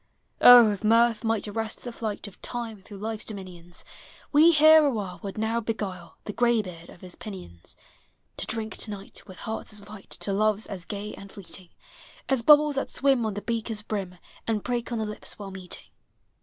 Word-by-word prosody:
Oh! 240 -3 +10
if 205 0 -5
Mirth 230 +1 +4
might 225 -2 0
arrest 220 +1 -3
the 245 - -5
flight 220 -3 -4
Of 205 - -14
Time 230 -4 -5
through 200 +1 -11
Life's 220 +1 -4
dominions. 180 -4 -8 0.5
We 315 +3 +7
here 310 0 +7
a 290 - +4
while 195 -8 -4
would 195 0 -6
now 220 +2 0
beguile 195 -6 -5
The 210 - -5
gra 240 +2 +2
ylieard 180 -7 -3
of - - -16
his 180 -1 -6
pinions. 180 - -10 0.6
To - - -1
drink 220 -1 -1
to - - -2
night, 200 -1 -7
with 185 -2 -11
hearts 220 -1 -4
as 210 -1 -5
light, 210 -2 -12
To 200 - -2
loves 215 +1 +2
as 185 -4 -7
gag 205 +1 -5
and 200 0 -11
fleeting 185 -2 -8 0.6
As 265 -3 +2
bubbles 300 +2 +6
that 275 - -1
swim 270 -5 +2
on 210 - -3
the 205 - -5
beaker's 225 -2 -3
brim, 195 -4 -4 0.3
And 220 -2 0
break 240 -1 -2
on 235 - -1
the 220 - -1
lips 210 0 -5
while 200 -2 -7
meeting. 190 -1 -7
215 Hz, 195 wpm, -26 LUFS, 195-230 Hz, 0.6 s, Oh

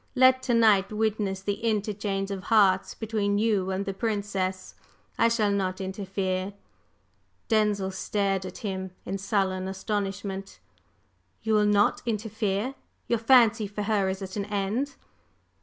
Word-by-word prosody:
"Let 260 0 +6
to 255 -2 +1
night 215 -4 +4
witness 210 -3 -1
the 205 +2 -3
interchange 205 -2 -1
of 195 -1 -5
hearts 195 -4 +3
between 210 -2 -1
you 205 -3 +1
and 190 +1 -2
the 195 - -3
Princess; 195 -3 -2 0.5
I 230 - +6
shall 225 -3 +2
not 190 -2 -1
interfere." 190 0 -3 1.0
Denzil 210 -3 +2
stared 195 0 -1
at 185 -1 -7
him 190 -1 -3 0.2
in 195 +1 -3
sullen 190 -2 0
astonishment. 195 0 -4 0.9
"You 220 0 +1
will 210 -1 +4
not 205 0 +3
interfere? 220 +1 -1 0.3
Your 235 - +1
fancy 230 -2 +5
for 205 +1 -4
her 205 -2 +1
is 190 +1 -4
at 190 0 -7
an 200 -1 -2
end?" 210 +7 -2
200 Hz, 140 wpm, -27 LUFS, 190-220 Hz, 1.0 s, Let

